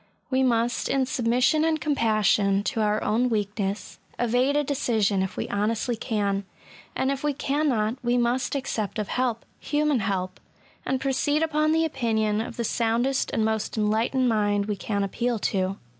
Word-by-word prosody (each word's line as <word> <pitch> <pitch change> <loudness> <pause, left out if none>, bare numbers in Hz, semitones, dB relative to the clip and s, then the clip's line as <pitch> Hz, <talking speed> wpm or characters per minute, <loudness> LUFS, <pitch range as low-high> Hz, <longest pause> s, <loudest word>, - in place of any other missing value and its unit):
We 260 0 +2
must, 240 -1 +1
in 270 -1 +2
submission 250 +4 +2
and 320 -1 +1
compassion 215 -8 +2
to 225 0 -1
our 210 0 +1
own 235 +4 +1
weakness, 205 -2 -3 0.2
evade 245 +4 +1
a 295 - +3
decision 220 -8 +1
if 190 - -3
we - - -2
honestly 220 +4 0
can; 205 -4 -1 0.5
and 265 - +1
if 275 0 -4
we 295 -1 +1
192 - - -21
ESSAYS. - - -6
cannot^ 265 -6 +1
we 240 +1 +2
must 245 +3 0
accept 235 -6 -3
of 210 -3 -3
help 245 -3 -1
— - - -39
Shaman 295 -3 +1
help 190 -3 -2 0.2
— - - -31
and 265 0 0
proceed 285 +3 +1
upon 310 -1 +1
the 325 +1 +3
opinion 220 -7 0
of 225 - -6
the 235 - -1
soundest 235 +4 0
and 220 - 0
most 220 0 -2
enlightened 225 +5 +1
mind 205 -3 +1
we 210 0 -2
can 200 +1 -2
appeal 235 +4 -1
to. 195 -2 -1
230 Hz, 180 wpm, -25 LUFS, 210-265 Hz, 0.5 s, a